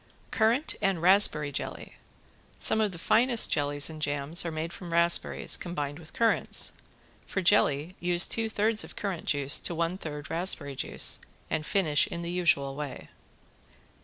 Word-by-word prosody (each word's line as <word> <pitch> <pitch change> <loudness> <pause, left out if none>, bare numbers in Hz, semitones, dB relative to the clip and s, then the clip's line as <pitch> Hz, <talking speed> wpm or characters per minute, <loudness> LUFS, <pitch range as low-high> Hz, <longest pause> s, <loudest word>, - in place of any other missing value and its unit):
~CURRANT 235 +7 +1
AND 195 -3 0
RASPBERRY 170 -5 +4
JELLY~ - - -6 0.6
Some 220 - 0
of 210 -2 0
the 175 - -9
finest 235 +6 +2
jellies 145 -1 +1
and 155 -1 -9
jams 145 +2 0
are 170 - -3
made 160 +2 -5
from 175 -2 -8
raspberries 170 +1 +3
combined 145 -4 -5
with 160 -2 -14
currants. 230 -3 +2 0.6
For - - -3
jelly 170 -3 +2
use 175 0 +2
two 225 -1 0
thirds 220 +1 0
of - - -11
currant 195 -5 -4
juice 145 -1 +4
to 170 - -1
one 170 +3 -2
third 150 -3 -7
raspberry 165 -5 -1
juice - - +1 0.3
and 155 - -1
finish 155 -7 +2
in 170 - -6
the 170 - -4
usual 160 -6 +1
way. 145 -2 -7
170 Hz, 160 wpm, -28 LUFS, 150-195 Hz, 0.6 s, RASPBERRY